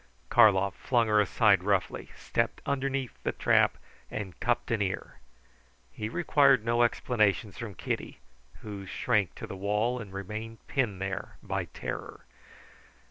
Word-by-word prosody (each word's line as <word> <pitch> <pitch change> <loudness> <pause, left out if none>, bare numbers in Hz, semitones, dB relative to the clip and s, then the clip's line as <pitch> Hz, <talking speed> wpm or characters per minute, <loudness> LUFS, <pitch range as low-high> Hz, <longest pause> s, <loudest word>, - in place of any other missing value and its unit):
Karlov 100 -4 +5
flung 120 -3 +1
her 105 -1 +4
aside 105 -1 +4
roughly, 100 -2 0
stepped - - -1
under 140 -1 0
the 135 -3 -3
trap, - - +3 0.3
and 95 -4 -6
cupped 120 +1 0
an 115 -2 +1
ear. 95 -2 -3 0.7
He 105 - -4
required 140 -5 +4
no 120 0 +2
explanations 110 -4 +1
from 110 -5 -6
Kitty, - - -4 0.4
who 100 -2 -7
shrank 100 -2 0
to - - -7
the - - -7
wall 105 +6 0
and 105 -4 -8
remained 110 +4 -6
pinned 105 -8 -1
there 95 -1 -4
by - - -2
terror. - - -7
105 Hz, 135 wpm, -29 LUFS, 100-120 Hz, 0.7 s, Karlov